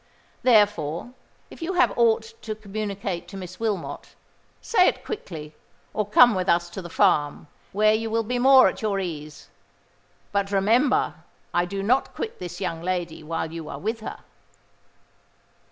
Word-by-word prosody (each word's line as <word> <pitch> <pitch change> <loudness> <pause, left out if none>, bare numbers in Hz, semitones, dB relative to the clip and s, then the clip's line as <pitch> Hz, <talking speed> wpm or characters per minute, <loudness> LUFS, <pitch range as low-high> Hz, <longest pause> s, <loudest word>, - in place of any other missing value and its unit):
Therefore, 205 - +2 0.4
if - - -12
you 340 +3 -2
have 355 -1 +3
aught 235 - +2
to 215 -1 -4
communicate 200 -4 -4
to 195 - -9
Miss 185 -1 -8
Wilmot, 220 -4 -3 0.4
say 365 -5 +3
it - - -1
quickly—or 160 - -7
come 240 +3 +7
with 185 -1 -1
us 175 0 +2
to 190 - -6
the 175 - -9
farm, 155 -7 +2 0.3
where 215 +2 +4
you 225 +1 -1
will 225 +1 0
be 245 +3 -2
more 265 +1 +7
at - - -3
your 205 -3 0
ease: 155 -5 -6 0.8
but, 200 -1 0
remember, 225 +8 +3 0.4
I 175 0 +2
do 195 +2 -4
not 250 +6 +1
quit 445 - -5
this 175 0 -7
young 170 -4 -3
lady 175 -2 -3
while 160 +1 -3
you 165 -2 -6
are - - -6
with 225 +3 -3
her." 220 - -7
200 Hz, 155 wpm, -24 LUFS, 175-225 Hz, 0.8 s, come